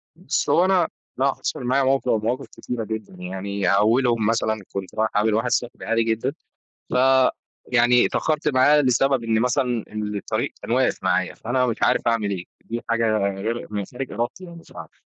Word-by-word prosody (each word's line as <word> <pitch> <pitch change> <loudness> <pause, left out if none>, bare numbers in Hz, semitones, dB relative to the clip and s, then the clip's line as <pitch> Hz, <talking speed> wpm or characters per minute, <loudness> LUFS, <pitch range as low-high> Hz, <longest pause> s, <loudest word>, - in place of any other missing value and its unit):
بُصّ، - - -2
هو 175 - +4
أنا 185 -3 +3 0.3
لأ 135 +1 +2
حصل - - -4
معايا 130 +3 +2
موقف 135 -1 +1
أو 110 - +2
مواقف 125 +5 -2
كتيرة 120 -2 -5
جدًا، 110 -2 -6
يعني 95 +1 -3
أولهم 115 +3 +3
مثلًا 110 -1 0
كنت 95 -2 -5
رايح 110 0 +1
أقابل 105 +1 +2
واحد 115 +3 +1
صاحبي 120 0 -2
عادي 115 0 +2
جدًا، 115 +4 -1 0.6
ف - - -3 0.8
يعني 125 0 +5
اتأخرت 155 -1 0
معاه 145 +2 +5
لسبب 130 -1 +2
إن 110 -1 +1
مثلًا 125 -1 0
إن 105 -1 -3
الطريق 100 - -2
كان - - -7
واقف - - +2
معايا - - 0
فأنا 125 +2 0
مش 120 -2 -1
عارف - - +3
أعمل 115 -3 +1
إيه؟ 90 -3 -4 0.2
دي 115 +1 -4
حاجة 115 0 +1
غرق 100 +4 -2
ما 105 - -1
هي - - -3
خارج 130 +1 -5
إرادتي 120 +11 -3
يعني 170 -1 -11
مش 165 - -15
عارف - - -11
115 Hz, 190 wpm, -23 LUFS, 110-130 Hz, 0.8 s, يعني